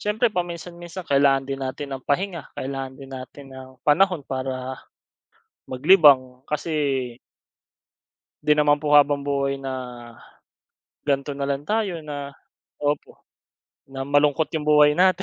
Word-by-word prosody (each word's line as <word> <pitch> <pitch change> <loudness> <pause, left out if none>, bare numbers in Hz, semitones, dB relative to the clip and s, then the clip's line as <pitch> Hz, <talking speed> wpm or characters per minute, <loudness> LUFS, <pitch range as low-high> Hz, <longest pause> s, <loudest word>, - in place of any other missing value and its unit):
siyempre 215 +2 +1
paminsan-minsan, 175 0 -5
kailangan 140 -1 +3
din 135 0 -4
natin 135 +1 -4
ng 135 - -8
pahinga, 170 +3 -2
kailangan 135 0 -5
din 135 0 -11
natin 130 +2 -9
ng 130 0 -10 0.2
panahon 175 0 +3
para, 130 0 -4 0.9
maglibang 130 -3 +5
kasi 145 -5 -1 1.3
'di 150 - +3
naman 145 -1 +3
po 150 -1 +4
habang-buhay 140 -1 +2
na 135 -1 -4 1.3
gan'to 140 0 -1
na 140 - -2
lang 140 +1 -2
tayo 210 -6 0
na 145 -2 -6 0.5
opo, 145 0 -2 0.7
na 135 0 -6
malungkot 145 +2 +2
yung 150 -1 -2
buhay 150 +1 +5
natin. 185 0 +4
145 Hz, 120 wpm, -23 LUFS, 135-155 Hz, 1.3 s, maglibang